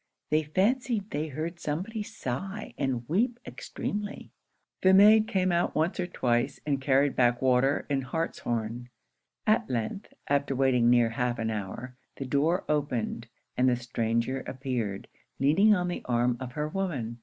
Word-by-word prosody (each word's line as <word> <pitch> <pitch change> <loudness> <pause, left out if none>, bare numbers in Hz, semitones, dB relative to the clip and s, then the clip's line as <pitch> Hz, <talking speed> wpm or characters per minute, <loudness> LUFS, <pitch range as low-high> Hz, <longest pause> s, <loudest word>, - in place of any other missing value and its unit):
They 155 +1 +4
fancied 210 - 0
they 150 +2 -2
heard 160 +4 -5
somebody 185 +10 -3
sigh 195 - -5
and 125 -4 -2
weep 235 +8 +1
extremely. 205 0 -5 0.5
The 190 0 +6
maid 215 +2 +7
came 185 -3 +1
out 170 0 +1
once 160 +5 0
or 180 - -1
twice 120 -8 0
and 140 -2 0
carried 135 +1 +2
back 120 -1 +3
water 130 +2 +2
and 135 -2 -1
hartshorn. 120 -6 -3 0.6
At 215 +1 +2
length, 120 - -3 0.2
after 140 -1 +1
waiting 125 -3 +3
near 120 -1 +4
half 120 +1 -1
an 110 -1 -1
hour, 110 +5 -5 0.2
the 135 - -5
door 150 +7 +1
opened, 125 -6 -1 0.3
and 130 +1 +3
the 125 - +3
stranger 115 +1 -1
appeared, 125 -7 -3 0.3
leaning 195 +10 +5
on 180 -1 -1
the 175 - -3
arm 120 0 +1
of 125 -1 -6
her 150 +2 -2
woman. 145 -11 -3
140 Hz, 155 wpm, -28 LUFS, 120-180 Hz, 0.6 s, maid